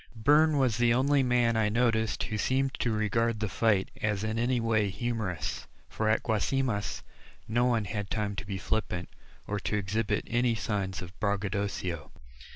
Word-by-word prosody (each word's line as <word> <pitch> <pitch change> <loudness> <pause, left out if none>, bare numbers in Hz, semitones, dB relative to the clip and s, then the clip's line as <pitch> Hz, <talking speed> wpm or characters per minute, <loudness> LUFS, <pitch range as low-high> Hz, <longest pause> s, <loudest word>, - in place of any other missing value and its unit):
Byrne 150 +7 +4
was 125 -5 +2
the 120 -1 +4
only 140 +2 +3
man 125 -2 +2
I 110 -1 +2
noticed 110 -1 +1
who 110 -3 -3
seemed 135 +2 +1
to 120 - +1
regard 110 +1 +1
the 110 - -1
fight 105 -1 +1
as 105 -1 0
in 110 +1 -1
any 120 +1 +1
way 110 -3 +1
humorous. 100 -7 -3 0.2
For 110 0 -1
at 110 - +2
Guasimas, 110 -1 -1 0.4
no 120 +3 +2
one 115 -4 +2
had 100 0 -4
time 105 -2 -2
to - - -4
be 95 -1 -3
flippant, 95 -3 -2 0.4
or 105 0 -2
to 105 - -1
exhibit 105 +1 -1
any 120 0 +1
signs 95 -3 -2
of 90 0 -10
braggadocio. 100 -5 -2
110 Hz, 165 wpm, -29 LUFS, 100-120 Hz, 0.4 s, Byrne